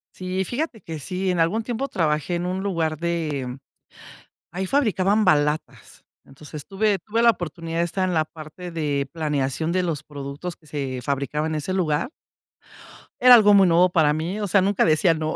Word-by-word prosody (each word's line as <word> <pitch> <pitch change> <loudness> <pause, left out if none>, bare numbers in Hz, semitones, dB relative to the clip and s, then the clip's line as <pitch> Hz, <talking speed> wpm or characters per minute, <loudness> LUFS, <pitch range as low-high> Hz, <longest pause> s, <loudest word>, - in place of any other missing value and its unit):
Sí, 185 +1 -2
fíjate 245 - -4
que 160 -2 -7
sí, 185 +4 -2
en 175 - -1
algún 200 +8 +1
tiempo 245 +4 -3
trabajé 160 - -1
en 175 +1 -2
un 185 +1 -2
lugar 165 -5 -1
de 150 -7 -2 0.9
ahí 185 +2 -3
fabricaban 215 -5 +2
balatas. 150 -2 0 0.2
Entonces, 150 +1 -10
tuve 200 0 +1
tuve 225 +6 -1
la 235 - +7
oportunidad 165 -3 -5
de 170 - +2
estar 185 +2 -1
en 180 - -1
la 155 -1 +2
parte 160 +3 -10
de 145 -4 -1
planeación 150 -1 -1
de 180 0 0
los 160 -5 -2
productos 145 +4 -7
que 155 - -25
se 135 -3 -4
fabricaba 140 +3 -2
en 160 - -2
ese 155 +4 -3
lugar. 170 - 0 1.1
Era 250 -1 +10
algo 210 -3 +6
muy 195 -2 +6
nuevo 175 +2 +4
para 155 -4 +3
mí, 170 +7 -3
o 205 - -2
sea, 195 +1 +4
nunca 200 0 +2
decía 160 +2 +3
no. 155 0 -3
170 Hz, 185 wpm, -23 LUFS, 150-190 Hz, 1.1 s, Era